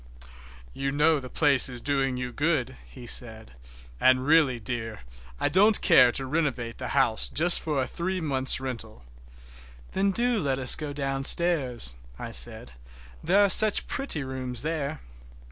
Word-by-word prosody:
"You 135 0 -3
know 150 +2 +2
the 130 -1 -10
place 140 -3 +5
is 125 -1 -2
doing 135 -1 -1
you 125 -1 -5
good," 140 -3 -2
he 125 -2 -13
said, 110 - -2 0.5
"and 130 0 +2
really, 150 -5 +2
dear, 115 -2 -6 0.4
I - - 0
don't 205 +3 +4
care 135 -9 +5
to 135 - 0
renovate 130 -5 -3
the - - -5
house 135 -5 0
just 170 +3 +2
for 150 -3 -3
a 130 - -1
three 185 +7 -4
months' 135 -6 +2
rental." 115 - -7 0.9
"Then 195 +1 0
do 240 +3 0
let 135 -6 -2
us 130 -2 +2
go 150 -2 -6
downstairs," 135 - 0 0.2
I - - -8
said, 60 0 -2 0.5
"there 195 +5 +3
are - - 0
such 215 +1 +4
pretty 220 - -2
rooms 130 -2 -5
there." 155 -1 -4
135 Hz, 155 wpm, -25 LUFS, 125-160 Hz, 0.9 s, place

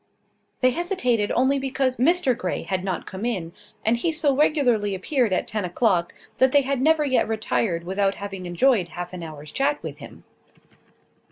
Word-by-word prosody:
They 255 0 +4
hesitated 250 - 0
only 265 +3 +2
because 265 -1 -1
Mr 275 -1 +3
Grey 255 - -3
had 185 -1 -2
not 190 -3 -3
come 190 +2 -7
in; 185 -9 -2 0.3
and 225 +2 +3
he 330 +8 0
so 300 -3 +1
regularly 245 -9 +2
appeared 240 +4 0
at 185 - 0
ten 215 -2 -3
o'clock, 180 -1 +1 0.3
that 260 0 +5
they 285 - +5
had 270 -1 -1
never 310 +1 +3
yet 260 -3 +2
retired 215 -5 -1
without 195 +2 0
having 195 -3 -6
enjoyed 190 +2 +2
half 175 +1 -7
an 180 - -6
hour's 155 -2 -9
chat 285 +2 +1
with - - -7
him. - - -12
235 Hz, 175 wpm, -24 LUFS, 190-270 Hz, 0.3 s, that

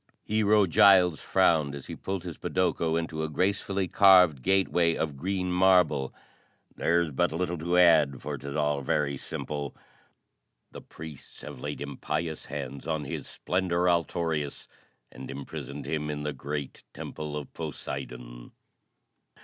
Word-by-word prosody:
Hero 105 -1 +3
Giles 90 -2 +5
frowned 80 -6 +2
as 70 - -9
he - - -7
pulled 95 -2 -4
his 85 -4 -6
podoko 85 -3 0
into 80 -1 -3
a 80 - -2
gracefully 95 +3 0
carved 90 -8 +6
gateway 90 -2 +2
of 75 -3 -2
green 90 +4 -2
marble. 90 -7 +3 0.6
"There's 85 -1 +1
but 75 +3 +1
little 90 +1 -2
to 85 +3 0
add, 80 -6 +5
for 75 +1 -4
'tis 70 0 -6
all 75 -2 0
very 70 +1 0
simple. 70 +1 -5 1.0
The - - -9
priests 80 -3 -11
have 75 -3 -9
laid 75 +3 -5
impious 75 +3 -4
hands 70 -1 -6
on 80 -2 -1
His - - -5
Splendor, 90 -1 -1
Altorius, 85 -4 -1 0.4
and 65 - -9
imprisoned 70 +1 -7
him 75 +1 -2
in 75 -1 -4
the 75 0 -2
great 70 +1 -5
temple 75 -1 -6
of 75 -3 -8
Poseidon. - - -7
80 Hz, 140 wpm, -28 LUFS, 70-90 Hz, 1.0 s, carved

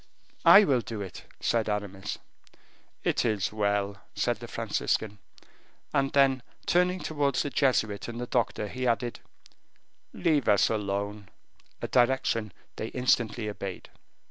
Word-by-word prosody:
"I 205 - +10
will 135 -9 +2
do 110 -1 -6
it," 95 -3 -8 0.2
said 115 -2 +1
Aramis. 100 -2 -3 0.9
"It - - +1
is 105 -4 0
well," 100 -1 0 0.2
said - - 0
the - - -9
Franciscan, 105 -2 -2 0.7
and 135 0 +2
then 135 -2 +4 0.2
turning 180 +1 +2
towards 145 -3 0
the 145 - -4
Jesuit 110 -8 +1
and 120 0 -6
the 125 - -3
doctor, 120 -4 -1
he 125 +4 -3
added, 120 0 0 0.9
"Leave 150 -6 +1
us 100 - +5
alone," 100 -1 -3 0.5
a - - 0
direction 120 -4 +2 0.3
they 110 - -3
instantly 120 -3 +1
obeyed. 100 -3 -6
115 Hz, 130 wpm, -28 LUFS, 105-130 Hz, 0.9 s, I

